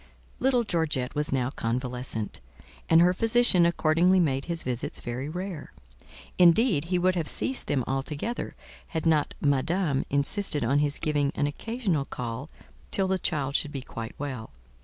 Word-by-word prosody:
Little 255 -2 +2
Georgette 155 - -1
was 150 0 -1
now 130 -1 0
convalescent; 125 -3 -3 0.5
and 165 +1 +7
her 180 +1 +5
physician 225 -4 +4
accordingly 170 +2 +3
made 135 -5 +1
his 170 -1 -2
visits 125 -1 -3
very 125 +4 -4
rare: 180 -2 -6 0.7
indeed, 175 - +5
he 180 +1 0
would 185 +1 +2
have 170 -4 -2
ceased 265 - +1
them 135 -3 +1
altogether, 145 - -3 0.3
had 160 -1 -4
not 155 -3 +2
Madame 145 +1 +1
insisted 145 - +1
on 135 +5 +2
his 145 -1 0
giving 145 -3 0
an 145 - +1
occasional 185 - -2
call 125 +3 -5 0.4
till 195 -1 0
the 190 0 0
child 145 -6 -1
should 150 - +1
be 140 -3 -5
quite 115 -3 -7
well. 130 -6 -5
150 Hz, 155 wpm, -27 LUFS, 135-180 Hz, 0.7 s, and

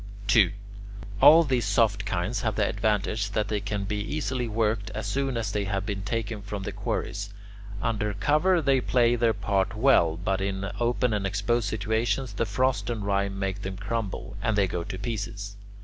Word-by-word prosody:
2. 100 -3 +5 0.7
All 165 +2 +9
these 130 -6 0
soft 105 -1 +2
kinds 100 +4 -1
have 110 -3 -1
the 105 -2 +2
advantage 105 0 0
that 105 -1 0
they 105 - 0
can 100 0 -3
be 105 +1 -2
easily 130 +1 -2
worked 110 -2 0
as - - -3
soon 135 -2 -1
as 115 - -2
they 105 -1 -1
have 95 0 -2
been 100 -1 -3
taken 110 +1 -3
from 100 0 -5
the - - -4
quarries. 100 0 -3 0.5
Under 105 -3 -1
cover 155 - +2
they 135 -2 +3
play 120 -1 +3
their 115 -2 +2
part 100 0 0
well; 105 -10 +4
but 95 +2 -1
in 100 0 -2
open 120 0 +1
and 100 -2 0
exposed 100 +3 0
situations 110 +3 -1
the 110 +3 -1
frost 130 -1 0
and 110 -4 -3
rime 100 -1 0
make 95 0 -2
them 95 -1 -5
crumble, 105 0 -4
and 110 -2 0
they 100 - +4
go 90 -2 -3
to 95 - -6
pieces. 100 -2 -4
105 Hz, 185 wpm, -27 LUFS, 100-115 Hz, 0.7 s, All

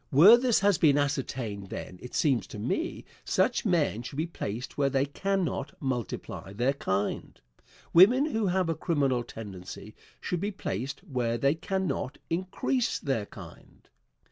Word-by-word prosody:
Where 175 - +9
this 245 -3 +2
has 200 -3 +3
been 145 -3 +5
ascertained, 130 -8 -2
then, 90 - -7
it 125 - -8
seems 135 -7 +2
to - - -9
me, 130 - -2 0.2
such - - +1
men 155 - +1
should 125 +2 -8
be 155 - +1
placed 125 -8 -5
where 140 -1 +2
they 135 0 +1
cannot 175 -2 -2
multiply 120 -6 -4
their 125 +6 +1
kind. 100 -7 -2 0.5
Women 235 - +7
who 225 -9 0
have 185 -1 +1
a 165 - +1
criminal 140 -8 0
tendency 105 -2 -9 0.3
should 180 - -2
be 200 - 0
placed 135 - -4
where 125 -9 -1
they 140 +4 +3
cannot 165 -5 -2
increase 190 +8 0
their 125 -8 -2
kind. - - -13
140 Hz, 150 wpm, -28 LUFS, 120-185 Hz, 0.5 s, Where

